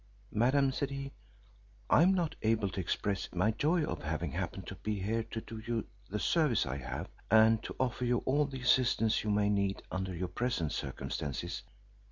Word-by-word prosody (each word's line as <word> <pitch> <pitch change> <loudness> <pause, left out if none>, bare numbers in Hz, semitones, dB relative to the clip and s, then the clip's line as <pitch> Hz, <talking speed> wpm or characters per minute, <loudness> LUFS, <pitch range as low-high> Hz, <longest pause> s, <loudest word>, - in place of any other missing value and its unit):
"Madam," 130 +5 +3
said 140 +1 -2
he, 135 0 -5 0.8
"I - - +6
am 190 +3 +5
not 170 -4 0
able 110 -2 +2
to 95 - -5
express 95 +2 -1
my 95 +5 +3
joy 155 +8 +2
at - - -4
having 80 0 -2
happened - - -4
to - - -7
be 105 -2 -2
here 110 +4 0
to 110 0 -5
do 110 0 -8
you 115 0 -2 0.2
the 105 - -2
service 150 - +2
I 65 +1 -3
have, 65 - -5 0.2
and 110 +1 +6
to - - -7
offer 125 -1 0
you 120 -1 +1
all 145 +3 +3
the 135 -2 -6
assistance 120 -3 +3
you 105 - -2
may 105 0 +3
need 100 -1 0
under 95 0 -2
your 90 +1 -3
present 90 -6 -1
circumstances." 70 -3 -4
110 Hz, 190 wpm, -32 LUFS, 95-130 Hz, 0.8 s, I